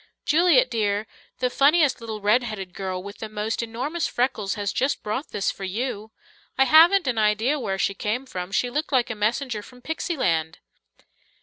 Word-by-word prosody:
"Juliet 305 Hz, -6 st, +4 dB
dear, 210 Hz, -2 st, 0 dB, 0.3 s
the 250 Hz, 0 st, -1 dB
funniest 290 Hz, -1 st, +3 dB
little 220 Hz, -2 st, -6 dB
red 210 Hz, +5 st, +4 dB
headed 205 Hz, -6 st, -6 dB
girl 185 Hz, -1 st, -4 dB
with 200 Hz, +1 st, -10 dB
the 220 Hz, -, -6 dB
most 215 Hz, +2 st, -2 dB
enormous 255 Hz, +9 st, -3 dB
freckles 225 Hz, -5 st, -1 dB
has 205 Hz, -2 st, -2 dB
just 270 Hz, +2 st, 0 dB
brought 215 Hz, +8 st, -3 dB
this 195 Hz, -, -1 dB
for 195 Hz, -, -10 dB
you. 215 Hz, +2 st, -4 dB, 0.5 s
I 270 Hz, -, +5 dB
haven't 335 Hz, +7 st, +6 dB
an 245 Hz, -4 st, 0 dB
idea 220 Hz, +7 st, +2 dB
where 195 Hz, -6 st, -2 dB
she 195 Hz, -, 0 dB
came 215 Hz, +6 st, -3 dB
from; 180 Hz, -6 st, -6 dB
she 245 Hz, +4 st, 0 dB
looked 300 Hz, +4 st, -2 dB
like 250 Hz, -3 st, +2 dB
a -, -, -4 dB
messenger 220 Hz, +2 st, -1 dB
from 250 Hz, +3 st, -16 dB
pixy 320 Hz, +1 st, -3 dB
land." 165 Hz, -, 0 dB
230 Hz, 185 wpm, -24 LUFS, 205-265 Hz, 0.5 s, haven't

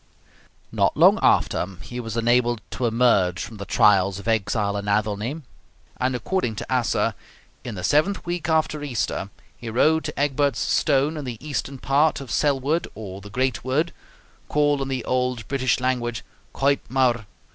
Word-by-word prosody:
Not -, -, +1 dB
long -, -, +6 dB
after -, -, +3 dB, 0.2 s
he 125 Hz, -, -7 dB
was 115 Hz, -1 st, -5 dB
enabled 120 Hz, 0 st, +2 dB
to 125 Hz, -, -1 dB
emerge 110 Hz, -7 st, +2 dB
from 110 Hz, -, -9 dB
the 100 Hz, -, -6 dB
trials 100 Hz, -2 st, +4 dB
of 100 Hz, +2 st, -9 dB
exile 105 Hz, -2 st, 0 dB
in 100 Hz, 0 st, -4 dB
Athelney; 105 Hz, +8 st, -1 dB, 0.6 s
and 130 Hz, 0 st, 0 dB
according 125 Hz, -, -1 dB
to -, -, -7 dB
Asser, 125 Hz, -6 st, +1 dB, 0.5 s
"In 120 Hz, -4 st, -6 dB
the 90 Hz, -, -6 dB
seventh 155 Hz, -, +2 dB
week 175 Hz, -1 st, -3 dB
after 155 Hz, -1 st, +1 dB
Easter, 120 Hz, -7 st, -2 dB, 0.3 s
he 115 Hz, -, -8 dB
rode 155 Hz, +8 st, +3 dB
to -, -, -5 dB
Egbert's 140 Hz, -2 st, +1 dB
Stone 145 Hz, +2 st, +1 dB
in 150 Hz, -, -5 dB
the 120 Hz, -3 st, -5 dB
eastern 140 Hz, -2 st, -3 dB
part 140 Hz, +4 st, +2 dB
of 135 Hz, -5 st, -8 dB
Selwood 145 Hz, +5 st, +1 dB
or 100 Hz, -3 st, -8 dB
the 105 Hz, -, -11 dB
Great 130 Hz, +2 st, -1 dB
Wood, 150 Hz, +7 st, 0 dB, 0.6 s
called 145 Hz, -1 st, +2 dB
in 135 Hz, -, -2 dB
the 130 Hz, -3 st, -3 dB
old 125 Hz, -4 st, -1 dB
British 130 Hz, -3 st, +1 dB
language 120 Hz, -2 st, -1 dB, 0.3 s
Coit 140 Hz, +1 st, +2 dB
mawr. 120 Hz, -3 st, +1 dB
125 Hz, 165 wpm, -23 LUFS, 110-140 Hz, 0.6 s, long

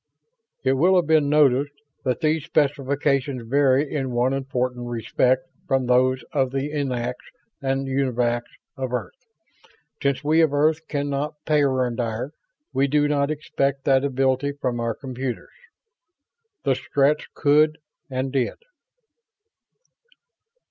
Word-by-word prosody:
It 130 Hz, 0 st, +3 dB
will 175 Hz, +8 st, +4 dB
have 180 Hz, -2 st, +3 dB
been 155 Hz, -2 st, +3 dB
noticed 145 Hz, -1 st, +3 dB, 0.3 s
that 130 Hz, +1 st, -1 dB
these 155 Hz, -1 st, +1 dB
specifications 140 Hz, -3 st, 0 dB
vary 140 Hz, +2 st, +2 dB
in 135 Hz, -3 st, -1 dB
one 125 Hz, +2 st, +1 dB
important 125 Hz, -2 st, -2 dB
respect 120 Hz, +4 st, +1 dB, 0.2 s
from 135 Hz, -5 st, +1 dB
those 125 Hz, 0 st, +3 dB
of 135 Hz, -4 st, +1 dB
the 135 Hz, +2 st, -3 dB
Eniacs 125 Hz, -4 st, -3 dB, 0.3 s
and 135 Hz, 0 st, -1 dB
Univacs 125 Hz, -3 st, 0 dB, 0.3 s
of 130 Hz, -2 st, -4 dB
Earth. 125 Hz, -, -3 dB, 0.9 s
Since 140 Hz, -1 st, 0 dB
we 155 Hz, +3 st, +4 dB
of 155 Hz, -3 st, +2 dB
Earth 155 Hz, +2 st, +2 dB
can 145 Hz, -1 st, -2 dB
not 145 Hz, +2 st, -2 dB
peyondire, 130 Hz, -4 st, 0 dB, 0.4 s
we 135 Hz, +1 st, +2 dB
do 145 Hz, +1 st, +2 dB
not 145 Hz, -1 st, +1 dB
expect 140 Hz, -3 st, -1 dB
that 135 Hz, 0 st, +4 dB
ability 135 Hz, +1 st, +1 dB
from 125 Hz, -4 st, -2 dB
our 115 Hz, -1 st, -1 dB
computers. 130 Hz, -2 st, -5 dB, 1.1 s
The 135 Hz, -, +3 dB
Stretts 140 Hz, +3 st, +1 dB
could, 155 Hz, +1 st, +3 dB, 0.3 s
and 130 Hz, 0 st, -2 dB
did. 130 Hz, -3 st, 0 dB
135 Hz, 125 wpm, -23 LUFS, 130-145 Hz, 1.1 s, will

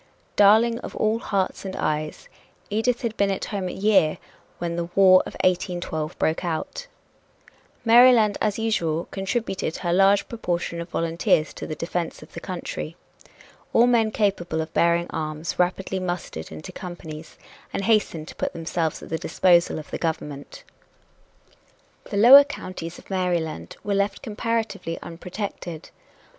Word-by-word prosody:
"Darling 220 Hz, +3 st, +5 dB
of -, -, -8 dB
all 215 Hz, +1 st, +1 dB
hearts 195 Hz, -4 st, -1 dB
and 190 Hz, -1 st, -5 dB
eyes," 155 Hz, 0 st, -2 dB, 0.4 s
Edith 235 Hz, +4 st, 0 dB
had 225 Hz, -2 st, -2 dB
been 200 Hz, 0 st, +2 dB
at 195 Hz, -, -2 dB
home 195 Hz, -3 st, -3 dB
a -, -, -3 dB
year 190 Hz, -6 st, +3 dB, 0.4 s
when 170 Hz, -1 st, -3 dB
the 170 Hz, 0 st, -2 dB
War 185 Hz, -1 st, +7 dB
of -, -, -9 dB
1812 175 Hz, -4 st, -1 dB
broke 160 Hz, +3 st, 0 dB
out. 180 Hz, -, -4 dB, 1.0 s
Maryland, 230 Hz, -3 st, +6 dB
as 210 Hz, -2 st, +1 dB
usual, 170 Hz, -8 st, 0 dB
contributed 195 Hz, -3 st, -2 dB
her 175 Hz, -2 st, -1 dB
large 195 Hz, +2 st, +4 dB
proportion 175 Hz, -6 st, -3 dB
of 170 Hz, -, -8 dB
volunteers 165 Hz, -2 st, +1 dB
to -, -, -7 dB
the 155 Hz, -, -4 dB
defense 170 Hz, +1 st, -4 dB
of -, -, -17 dB
the -, -, -6 dB
country. 175 Hz, -3 st, -5 dB, 0.8 s
All 235 Hz, -, +6 dB
men 235 Hz, -3 st, +3 dB
capable 195 Hz, -6 st, 0 dB
of 160 Hz, 0 st, -4 dB
bearing 170 Hz, 0 st, +3 dB
arms 155 Hz, +1 st, -4 dB
rapidly 185 Hz, +1 st, 0 dB
mustered 175 Hz, -, -5 dB
into 80 Hz, -1 st, -8 dB
companies 165 Hz, -3 st, -9 dB, 0.3 s
and 195 Hz, -, -3 dB
hastened 195 Hz, -7 st, +1 dB
to -, -, -10 dB
put -, -, -3 dB
themselves 165 Hz, -1 st, -2 dB
at -, -, -10 dB
the 160 Hz, -, -2 dB
disposal 175 Hz, 0 st, +3 dB
of 155 Hz, -, -9 dB
the -, -, -3 dB
government. 160 Hz, -, -4 dB, 1.4 s
The 200 Hz, -, -4 dB
lower 255 Hz, +7 st, +10 dB
counties 185 Hz, -11 st, -7 dB
of -, -, -15 dB
Maryland 170 Hz, -, -2 dB
were 205 Hz, -, -1 dB
left 200 Hz, +4 st, 0 dB
comparatively 225 Hz, -6 st, -2 dB
unprotected. 175 Hz, -1 st, -7 dB
185 Hz, 150 wpm, -24 LUFS, 165-210 Hz, 1.4 s, lower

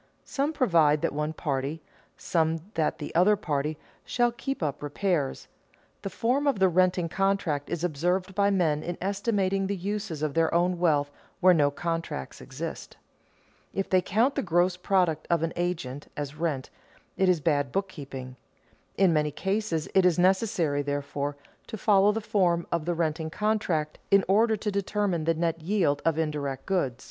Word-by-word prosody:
Some 285 Hz, +2 st, -1 dB
provide 165 Hz, -, +3 dB
that -, -, 0 dB
one 150 Hz, +1 st, -1 dB
party, 145 Hz, -1 st, -3 dB, 0.4 s
some 160 Hz, -1 st, 0 dB
that 160 Hz, -2 st, 0 dB
the 145 Hz, -, -7 dB
other 185 Hz, +5 st, +5 dB
party, 150 Hz, -5 st, -2 dB, 0.3 s
shall 240 Hz, -1 st, +1 dB
keep 270 Hz, -, -4 dB
up 145 Hz, -2 st, -2 dB
repairs. 145 Hz, -1 st, -1 dB, 0.5 s
The 195 Hz, -, -4 dB
form 255 Hz, +8 st, 0 dB
of 275 Hz, -, +2 dB
the 190 Hz, -1 st, +4 dB
renting 180 Hz, 0 st, +2 dB
contract 185 Hz, -6 st, 0 dB
is 170 Hz, -1 st, -3 dB
observed 180 Hz, +4 st, 0 dB
by 200 Hz, +1 st, +3 dB
men 165 Hz, -7 st, +1 dB
in 175 Hz, +1 st, -4 dB
estimating 195 Hz, -1 st, 0 dB
the 200 Hz, -, -1 dB
uses 195 Hz, -4 st, -4 dB
of 150 Hz, -2 st, -1 dB
their 165 Hz, +1 st, +2 dB
own 175 Hz, +1 st, +2 dB
wealth 145 Hz, -5 st, +2 dB, 0.3 s
where 185 Hz, 0 st, +6 dB
no 145 Hz, -4 st, +3 dB
contract 165 Hz, -, -4 dB
exists. -, -, -7 dB, 0.8 s
If 195 Hz, -, -2 dB
they 185 Hz, -1 st, +5 dB
count 230 Hz, +9 st, +2 dB
the -, -, -1 dB
gross 175 Hz, +1 st, +2 dB
product 180 Hz, -3 st, +1 dB
of 170 Hz, -2 st, +2 dB
an 165 Hz, -, -1 dB
agent 160 Hz, -6 st, -3 dB
as 145 Hz, -1 st, -4 dB
rent, 150 Hz, -5 st, -2 dB, 0.4 s
it 190 Hz, -1 st, +2 dB
is 180 Hz, -3 st, +3 dB
bad 145 Hz, -4 st, +1 dB
bookkeeping. 135 Hz, -9 st, -5 dB, 0.6 s
In 190 Hz, -4 st, +4 dB
many 150 Hz, -1 st, +2 dB
cases 195 Hz, -1 st, -2 dB
it 190 Hz, -, +5 dB
is 180 Hz, -2 st, +3 dB
necessary, 180 Hz, -5 st, +2 dB
therefore, 145 Hz, 0 st, -3 dB, 0.3 s
to 220 Hz, -, -6 dB
follow 200 Hz, -1 st, +4 dB
the 225 Hz, +2 st, -3 dB
form 175 Hz, -5 st, +1 dB
of 170 Hz, -2 st, -1 dB
the 175 Hz, 0 st, 0 dB
renting 160 Hz, -1 st, -1 dB
contract 180 Hz, -6 st, -1 dB
in 195 Hz, -1 st, +5 dB
order 220 Hz, +3 st, +3 dB
to 210 Hz, 0 st, -2 dB
determine 200 Hz, -4 st, -1 dB
the 165 Hz, 0 st, +2 dB
net 165 Hz, 0 st, -1 dB
yield 165 Hz, -5 st, +1 dB
of 165 Hz, -1 st, +2 dB
indirect 145 Hz, -4 st, -2 dB
goods. 140 Hz, -11 st, -1 dB
170 Hz, 170 wpm, -27 LUFS, 150-195 Hz, 0.8 s, where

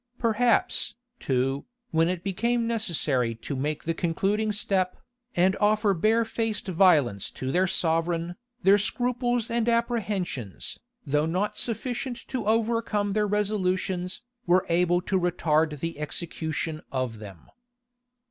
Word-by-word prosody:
Perhaps, 230 Hz, -2 st, +2 dB, 0.2 s
too, 135 Hz, -, -1 dB, 0.2 s
when 165 Hz, 0 st, +3 dB
it 180 Hz, -1 st, -2 dB
became 235 Hz, +5 st, 0 dB
necessary 155 Hz, -, 0 dB
to 115 Hz, +5 st, -5 dB
make 150 Hz, +3 st, -2 dB
the 165 Hz, -, -1 dB
concluding 195 Hz, +6 st, 0 dB
step, 190 Hz, -3 st, 0 dB, 0.4 s
and 185 Hz, +2 st, +3 dB
offer 210 Hz, 0 st, +3 dB
barefaced 220 Hz, +2 st, 0 dB
violence 160 Hz, -, +3 dB
to 130 Hz, 0 st, -4 dB
their 185 Hz, +4 st, +3 dB
sovereign, 170 Hz, +1 st, 0 dB, 0.3 s
their 200 Hz, +2 st, +6 dB
scruples 245 Hz, +1 st, 0 dB
and 235 Hz, 0 st, +1 dB
apprehensions, 205 Hz, -, -2 dB, 0.3 s
though 150 Hz, +2 st, +1 dB
not 200 Hz, +5 st, -1 dB
sufficient 245 Hz, +3 st, -2 dB
to 250 Hz, -6 st, -3 dB
overcome 220 Hz, -2 st, +1 dB
their 210 Hz, 0 st, +2 dB
resolutions, 190 Hz, -2 st, -1 dB, 0.2 s
were 180 Hz, +1 st, +4 dB
able 175 Hz, +1 st, +3 dB
to 190 Hz, 0 st, +1 dB
retard 160 Hz, -4 st, +1 dB
the 165 Hz, -2 st, -4 dB
execution 160 Hz, 0 st, -3 dB
of 130 Hz, -4 st, -2 dB
them. 100 Hz, -6 st, -11 dB
185 Hz, 120 wpm, -26 LUFS, 160-215 Hz, 0.4 s, their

